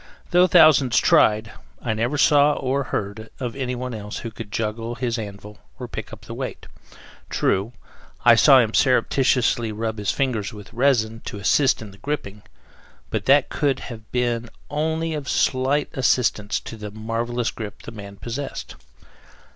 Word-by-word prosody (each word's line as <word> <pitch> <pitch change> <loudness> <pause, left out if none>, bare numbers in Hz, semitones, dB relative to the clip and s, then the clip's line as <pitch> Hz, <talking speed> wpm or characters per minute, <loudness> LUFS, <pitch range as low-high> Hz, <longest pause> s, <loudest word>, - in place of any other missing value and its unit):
Though 180 +1 +5
thousands 145 -7 +6
tried, 110 +1 +4 0.3
I 115 - -2
never 120 +7 -1
saw, 145 0 +5
or 135 0 -1
heard, 110 0 -4
of 125 -3 -4
anyone 125 -1 -3
else 105 -1 -6
who 115 - -4
could 110 -2 -9
juggle 115 +2 -3
his 120 -1 -2
anvil 105 0 -8 0.2
or - - -6
pick - - -7
up - - -10
the - - -9
weight. - - -6 0.6
True, 100 +5 0 0.5
I 120 - +9
saw 135 +4 +7
him 115 -3 +3
surreptitiously 125 -3 +2
rub 110 0 -3
his 105 - -2
fingers 115 -8 -1
with 105 +1 -12
resin, 115 -3 +1
to - - -5
assist 120 +6 +2
in 105 - -10
the 100 - -17
gripping, 105 -6 -4 0.7
but - - -2
that 140 0 +4
could 140 -3 0
have 110 -2 -11
been 120 -1 -1 0.2
only 160 +2 -1
of 145 -2 -4
slight 135 +3 +1
assistance 115 -5 +1
to 115 - -9
the 105 -1 -7
marvelous 115 +3 -2
grip 105 -3 -8
the - - -8
man 100 -2 -9
possessed. 120 +7 -6
120 Hz, 160 wpm, -23 LUFS, 110-135 Hz, 0.7 s, I